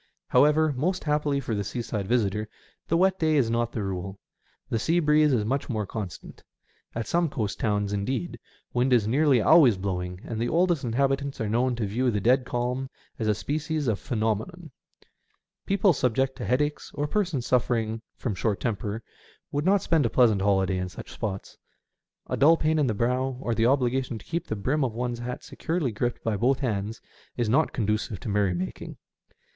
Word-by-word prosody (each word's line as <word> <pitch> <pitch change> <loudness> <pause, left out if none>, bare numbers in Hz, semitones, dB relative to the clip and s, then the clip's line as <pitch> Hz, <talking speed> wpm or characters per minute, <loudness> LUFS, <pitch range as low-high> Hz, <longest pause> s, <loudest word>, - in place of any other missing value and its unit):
However, 150 +3 +4
most 180 +8 -1
happily 150 -2 +1
for 120 - -3
the 100 -1 -1
seaside 105 -2 -4
visitor, 105 -2 0 0.4
the 165 - +2
wet 190 +1 +3
day 155 -1 +2
is 125 -6 +2
not 120 0 0
the 110 - -3
rule. 95 0 -4 0.5
The 115 - -1
sea 165 +9 +2
breeze 150 -1 +4
is 115 -5 +1
much 135 +6 -1
more 110 -4 -1
constant. 100 -4 -7 0.5
At 115 -1 -2
some 170 -1 +1
coast 110 -7 -3
towns, 105 -2 0
indeed, 100 0 -2 0.3
wind 125 +1 +2
is 110 -4 +3
nearly 135 0 +3
always 140 - +6
blowing, 90 -1 -3
and 115 -2 -5
the 120 - 0
oldest 175 -3 +2
inhabitants 135 +3 0
are 110 - -1
known 120 +4 +1
to 115 -2 -2
view 120 +6 0
the 105 -3 0
dead 125 +5 +3
calm 125 +2 -2 0.3
as 110 - -1
a 105 - +3
species 155 - -2
of 110 -4 0
phenomenon. 120 - -2 1.0
People 195 -1 +4
subject 130 0 0
to - - -4
headaches, 145 +4 0
or 145 - -1
persons 170 - -1
suffering 115 -3 0
from 120 - -3
short 100 +2 -1
temper, 110 -1 -3 0.5
would 145 +2 -1
not 195 +1 +3
spend 160 -7 +2
a - - -3
pleasant 110 -4 +4
holiday 95 -2 +2
in 90 0 -3
such - - -10
spots. 100 -4 -5 0.7
A - - -2
dull 160 +4 +5
pain 155 0 +1
in 145 - +2
the 110 - 0
brow, 125 +3 0
or 120 -3 -1
the 115 +1 +2
obligation 130 -2 +1
to - - -13
keep 170 +1 -3
the 110 - -2
brim 135 +9 0
of 120 -4 -2
one's 120 0 -2
hat 125 +1 -5
securely 160 -6 -2
gripped 120 +3 -2
by 110 -2 0
both 125 +6 +2
hands, 110 -3 -2 0.4
is 120 -2 0
not 135 +8 +2
conducive 105 -2 -1
to 120 - -5
merry 100 -3 +1
making. 90 +2 -5
120 Hz, 190 wpm, -26 LUFS, 105-145 Hz, 1.0 s, always